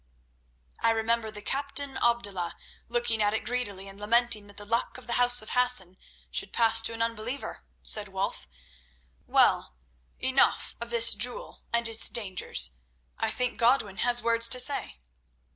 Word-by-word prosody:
"I 230 - +2
remember 225 0 0
the 210 -1 -8
captain 280 +1 -3
Abdullah 200 -7 -1 0.3
looking 235 -2 0
at 205 +1 +1
it - - -4
greedily 210 -5 -3
and 195 +1 -8
lamenting 220 0 +1
that 205 - -14
the 205 - -5
Luck 230 +4 -1
of 255 - -12
the 235 - -3
House 245 -1 +4
of - - -8
Hassan 250 -8 +1 0.4
should - - -4
pass 225 -1 +4
to 225 - 0
an 230 0 -2
unbeliever," 230 +4 -5 0.2
said 210 -1 +3
Wulf. 195 - -4 0.8
"Well, - - +2 0.4
enough - - +1
of 235 - -5
this 230 -1 +6
jewel 245 0 -2
and 235 0 +3
its 225 0 +3
dangers; 125 - 0 0.4
I - - 0
think 250 -1 -2
Godwin 230 -5 +1
has 240 0 +1
words 230 0 +3
to 255 - +2
say." 265 - 0
230 Hz, 160 wpm, -27 LUFS, 205-240 Hz, 0.8 s, this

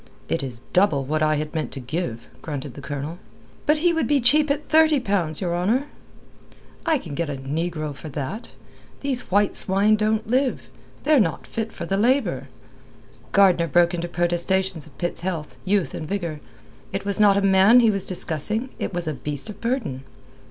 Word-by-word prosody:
"It - - 0
is 125 -4 -6
double 170 -8 +3
what 155 +3 -1
I 155 0 +3
had 150 0 -3
meant 160 -2 -2
to 135 - -5
give," 125 -3 -4
grunted 145 -4 -5
the 140 - -10
Colonel. 145 +5 -5 0.5
"But 300 +1 +4
he 340 +3 +2
would 325 - 0
be 290 -1 +3
cheap 295 +5 +4
at 290 +1 -1
thirty 315 -2 +5
pounds, 195 -9 -1
your 175 -2 -1
honour." 220 +11 +1 1.0
"I 320 -2 +4
can 170 - -8
get 165 +2 -2
a 145 - -3
negro 155 +2 -3
for 155 +3 -9
that. 145 - -5 0.5
These 270 -3 -1
white 205 +1 +2
swine 200 +3 +3
don't 215 0 0
live. 255 +3 0 0.3
They're 305 -2 +5
not 165 -8 0
fit 225 0 -4
for 170 - -6
the 195 +3 0
labour." 205 - +1 0.8
Gardner 185 -4 +4
broke 170 +3 +3
into 175 0 -2
protestations 175 0 0
of 140 - -19
Pitt's 175 -1 -2
health, 170 -4 -4
youth, 195 -2 +1
and 155 - -5
vigour. 170 -5 -3 0.5
It 195 +1 -4
was 200 +1 -1
not 205 -2 +6
a - - +2
man 195 +5 +6
he 225 -2 +5
was 195 -2 -2
discussing; 190 - -1
it - - -3
was 175 -2 -2
a 155 - -1
beast 145 - -4
of 205 - -14
burden. 235 - -2
180 Hz, 185 wpm, -23 LUFS, 155-220 Hz, 1.0 s, not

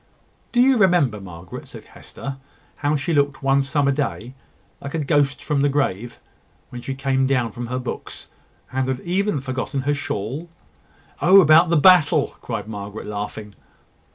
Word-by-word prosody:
"Do 245 - +3
you 260 0 +5
remember, 165 - +3
Margaret," 90 -2 -10
said - - -11
Hester, 135 -1 -9 0.4
"how 145 0 0
she 150 +4 -1
looked 145 -2 +1
one 135 0 +3
summer 140 0 +1
day, 135 -4 -3 0.5
like 140 +3 -6
a - - 0
ghost 145 -2 +1
from 150 -3 0
the 145 - +3
grave, 120 -5 -2 0.5
when 125 - -7
she 135 +2 -5
came 135 -1 0
down 125 -4 0
from 120 +2 -6
her 125 +2 -3
books, 130 -1 -6 0.4
and 130 0 -1
had 130 -1 -2
even 190 -1 0
forgotten 130 +1 -3
her 145 +2 0
shawl?" 140 +4 -4 0.7
"Oh, 190 +3 +7
about 165 0 +6
the 170 - +3
battle!" 155 -3 +5
cried 110 -4 -5
Margaret, 105 -1 -7
laughing. 105 0 -6
135 Hz, 160 wpm, -22 LUFS, 120-150 Hz, 0.7 s, Oh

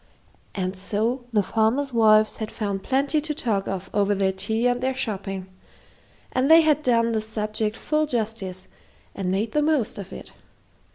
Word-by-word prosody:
And 185 0 -2
so 220 +6 -2
the 210 -3 +2
farmers' 230 +7 0
wives 215 -2 +4
had 220 -1 -4
found 200 -3 -3
plenty 275 +6 +1
to 300 0 -3
talk 225 -11 -1
of 190 -1 -4
over 205 0 +2
their 190 -1 +1
tea 220 +5 -1
and 245 0 +2
their 260 0 0
shopping, 195 -6 -3 0.9
and 255 +3 +1
they 325 +1 +9
had 305 -1 +3
done 230 -4 +2
the 220 -1 0
subject 215 0 -3
full 305 0 0
justice 215 -7 -3 0.5
and 190 -2 -3
made 205 +4 -1
the 300 - +1
most 295 -9 0
of 195 -1 -8
it. - - -10
220 Hz, 170 wpm, -24 LUFS, 200-255 Hz, 0.9 s, they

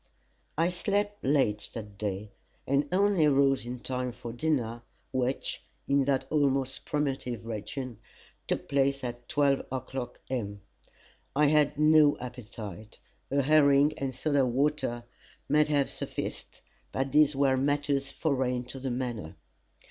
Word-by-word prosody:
I 165 +2 +3
slept 205 +3 -1
late 130 -7 +2
that 105 -3 -8
day, 100 0 -3 0.3
and 140 +2 +1
only 190 -4 +4
rose 135 -3 +3
in 125 0 -5
time 125 -1 -2
for 115 0 -7
dinner, 120 -4 -1 0.3
which, 130 +1 -1 0.3
in 140 -1 +3
that 135 -1 +1
almost 135 -3 +1
primitive 135 -6 -2
region, 115 +2 -5 0.5
took - - -2
place 140 -1 +1
at 120 -1 -5
12 145 -3 +2
o'clock, 130 -1 -5
M. 100 -6 -3 0.7
I 150 +2 +4
had 150 -1 +3
no 150 -1 +5
appetite. 110 -5 -7 0.3
A 140 0 +2
herring 145 0 +5
and 135 -3 -3
soda 145 -3 +2
water 130 -1 0 0.4
might 150 +1 +4
have 145 -2 +2
sufficed, - - -6 0.3
but 135 0 -1
these 150 0 +5
were 135 -1 +3
matters 140 0 0
foreign 130 -5 0
to 135 - -7
the 135 0 -3
manor. 120 -9 -4
135 Hz, 135 wpm, -29 LUFS, 120-145 Hz, 0.7 s, no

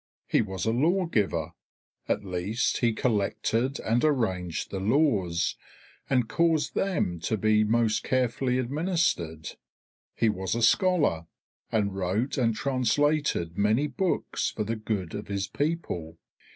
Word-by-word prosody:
He - - +2
was 95 -5 -4
a 110 - +2
lawgiver; 155 - +1 0.6
at - - 0
least 95 +6 -1
he 120 -2 +3
collected 115 +3 0
and 115 +2 +1
arranged 95 - 0
the 95 - -3
laws, 100 - +1 0.5
and 125 -4 +2
caused 165 -1 +1
them 155 - 0
to 110 +7 -1
be 110 +1 +3
most 110 0 +1
carefully 125 0 0
administered. 130 - -1 0.7
He 115 - +2
was 95 -2 -1
a 120 - -1
scholar, 145 - +3 0.4
and 105 -3 +1
wrote 95 +7 -1
and 115 -4 +1
translated 135 - 0
many 110 +7 +3
books 180 +5 -1
for 110 - -3
the 115 +2 -2
good 105 -5 -3
of 105 0 -5
his 100 0 -2
people. 140 - -3
110 Hz, 130 wpm, -27 LUFS, 95-140 Hz, 0.7 s, he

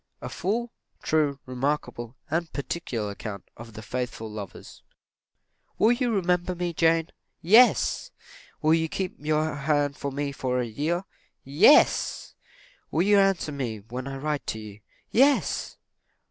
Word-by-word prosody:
A - - -6
FULL, 230 +6 -2 0.3
TRUE, 150 -3 +1
REMARKABLE, 130 -2 -3
& - - -39 0.2
PARTICULAR 125 -8 -3
ACCOUNT 100 0 -7
OF 115 -1 -11
THE 110 - -9
FAITHFUL 120 -1 -4
LOVERS. 105 -3 -9 1.0
""Will 220 - +5
you 245 0 +1
remember 180 -3 0
me, 175 -1 -2
Jane?" 165 0 +2 0.3
"Yes!" 235 - +5 0.5
"Will 155 +1 +5
you 160 0 +1
keep 185 +1 -3
your 155 +1 0
hand 145 0 0
for 140 -1 -4
me 140 +1 -2
for 130 -2 -2
a 125 - 0
year?" 155 - -2 0.4
"Yes!" 160 - +4 0.6
"Will 165 - +1
you 205 +1 +5
answer 195 -5 +2
me 120 -7 -4
when 125 +2 -5
I 135 0 -5
write 150 +1 -3
to - - -2
you?" 105 -1 -10 0.3
"Yes!" 275 +4 +2
150 Hz, 140 wpm, -26 LUFS, 125-175 Hz, 1.0 s, Will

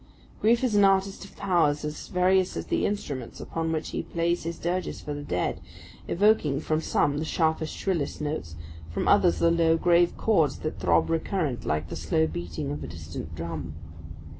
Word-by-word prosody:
Grief 235 +3 +3
is 250 -4 +1
an 205 -1 +5
artist 195 0 +2
of - - -15
powers 165 -6 +1
as 150 0 -5
various 185 0 +2
as - - -4
the - - +1
instruments 140 - -4
upon 165 0 -3
which 160 -1 -2
he - - -2
plays 170 0 -1
his 165 0 -3
dirges 180 +2 -2
for 150 - -5
the 145 - -5
dead, 90 -11 -2 0.5
evoking 170 -8 +3
from 155 0 -1
some 145 -2 +1
the - - -1
sharpest, 160 0 0
shrillest 175 -7 -1
notes, 145 - -4 0.3
from 85 - -2
others 185 -4 +5
the 170 - +3
low, 165 -1 +3
grave 175 +1 +3
chords 165 -10 +2
that 155 -11 -5
throb 85 - +2
recurrent 160 - -1
like 75 +1 -1
the - - -5
slow 160 -2 +1
beating 85 - -4
of 75 +1 -4
a - - -5
distant 80 +1 -7
drum. 80 -1 -5
160 Hz, 185 wpm, -27 LUFS, 130-180 Hz, 0.5 s, an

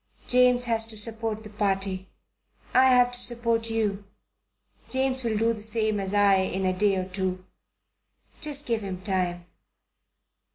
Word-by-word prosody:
"James 250 0 +4
has 225 -2 0
to 220 -1 -5
support 220 0 0
the 215 - -10
Party. 195 -2 -2 0.7
I 260 +1 +5
have 250 -1 +4
to 245 - -3
support 230 -2 0
you. 210 -3 -2 0.9
James 260 0 +1
will 225 -2 -1
do 225 +2 +1
the 215 - -8
same 215 -1 +1
as 190 -1 -4
I 200 -1 +4
in 190 0 -1
a 185 - +1
day 200 +1 +2
or 185 -1 -2
two. 185 -1 -4 1.0
Just 295 -2 +1
give 230 -2 -1
him 190 -2 -6
time. 180 -3 -2
215 Hz, 155 wpm, -26 LUFS, 195-235 Hz, 1.0 s, I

